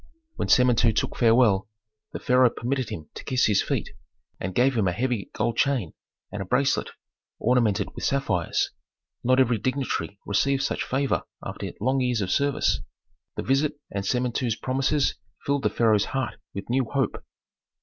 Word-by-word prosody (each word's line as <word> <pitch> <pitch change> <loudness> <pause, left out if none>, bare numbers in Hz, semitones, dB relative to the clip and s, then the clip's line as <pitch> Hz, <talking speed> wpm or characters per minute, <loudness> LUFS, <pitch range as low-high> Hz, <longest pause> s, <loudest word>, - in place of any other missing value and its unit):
When - - -2
Samentu 120 -2 +4
took - - -1
farewell, 115 -4 +4 0.4
the - - -4
pharaoh 125 0 +4
permitted 125 0 -2
him 80 -9 -7
to - - -8
kiss 130 -1 +2
his 105 -3 +3
feet, - - -2 0.5
and 90 0 -4
gave 130 +4 +3
him 105 -4 +2
a - - +2
heavy 120 -1 -2
gold 115 +1 -1
chain 130 - +1 0.4
and 105 - -4
a - - -4
bracelet 135 +8 +1 0.5
ornamented 110 -4 +1
with - - -8
sapphires. 135 -11 0 0.5
Not 130 +2 +3
every 120 -4 +3
dignitary 130 -4 -2
received 135 +7 +1
such - - -1
favor 135 +1 0 0.2
after - - -5
long 130 +4 +1
years 125 -3 +1
of 95 -1 -2
service. 140 +3 +1 0.5
The - - -3
visit 145 +2 +1
and 100 0 -3
Samentu's 125 +1 0
promises 135 +3 0 0.3
filled 140 0 +1
the - - +2
pharaoh's 110 -3 +3
heart 135 -3 -3 0.2
with 100 - -5
new 130 0 +2
hope. 135 -1 -2
125 Hz, 160 wpm, -25 LUFS, 105-135 Hz, 0.5 s, Samentu